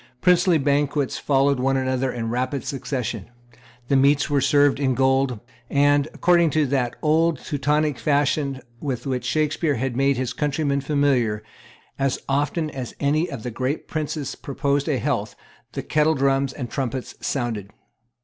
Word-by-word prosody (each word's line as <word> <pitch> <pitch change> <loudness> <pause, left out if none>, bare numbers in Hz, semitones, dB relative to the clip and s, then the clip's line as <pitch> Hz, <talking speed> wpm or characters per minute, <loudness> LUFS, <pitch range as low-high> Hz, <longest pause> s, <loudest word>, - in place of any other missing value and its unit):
Princely 180 +1 +4
banquets 145 -1 0
followed 140 -1 +2
one 135 +1 +1
another 130 0 0
in 115 -2 -3
rapid 130 +3 -2
succession. 125 -7 -3 0.6
The 140 - +2
meats 140 +2 +3
were 140 -1 +3
served 145 -1 +3
in 130 -3 +1
gold; 130 -2 +2 0.3
and, 145 0 +3
according 170 -2 +3
to 155 - +4
that 130 -3 -1
old 160 +1 +3
Teutonic 150 +1 0
fashion 140 -2 +1 0.2
with 135 -3 -4
which 130 -3 -2
Shakspeare 155 +2 0
had 125 +1 -2
made 135 0 +2
his 125 -1 -2
countrymen 145 -1 0
familiar, 135 -7 +1 0.6
as 135 -1 +1
often 145 +3 0
as 130 -3 -6
any 155 +4 +1
of 130 -6 -7
the 125 - -4
great 130 +6 -3
princes 150 -2 -3
proposed 140 +1 -1
a 140 - +1
health, 120 -7 -2 0.4
the - - -4
kettle 155 +1 +2
drums 135 -1 +1
and 130 -3 -5
trumpets 130 0 -4
sounded. 115 -7 -2
140 Hz, 150 wpm, -23 LUFS, 130-145 Hz, 0.6 s, Princely